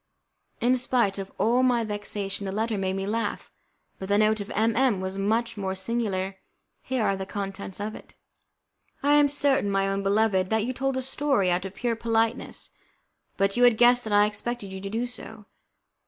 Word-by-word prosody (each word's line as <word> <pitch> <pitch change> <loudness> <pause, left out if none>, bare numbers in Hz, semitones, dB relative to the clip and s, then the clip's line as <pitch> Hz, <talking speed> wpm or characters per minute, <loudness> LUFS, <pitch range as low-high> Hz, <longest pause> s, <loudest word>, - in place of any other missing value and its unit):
In 250 +2 +3
spite 240 -5 +1
of 195 0 -6
all 240 +3 +3
my 245 -2 +3
vexation, 205 -2 -4
that 190 - -3
letter 220 +2 -1
made 190 -1 -1
me 195 0 -2
laugh, 215 0 -2 0.5
but 190 - -6
the 200 - +4
note 215 0 +3
of 200 - -7
M 225 +2 +1
M 245 -5 +2
was 190 +1 -4
much 225 +3 0
more 190 -1 -2
singular. 195 -2 -2 0.4
Here 260 -3 -1
are 195 - +2
the 190 0 -5
contents 195 -1 -5
of 210 +1 -3
it: - - -13 0.9
"I 290 +1 +4
am 295 -1 +6
certain, 280 -6 +2
my 195 0 +1
own 195 0 -1
beloved, 195 -2 +2
that 220 -1 +1
you 255 - -2
told 270 0 -1
a 260 - -2
story 265 -8 +1
out 180 +2 0
of 195 0 -7
pure 240 -2 -1
politeness, 225 +1 -1 0.7
but 195 0 +2
you 245 - +3
had 240 -3 +6
guessed 245 +1 +5
that 220 - -4
I 205 0 +6
expected 210 -1 -4
you 190 - -6
to 195 - -5
do 225 +4 -1
so. 220 -3 -9
215 Hz, 200 wpm, -26 LUFS, 195-240 Hz, 0.9 s, am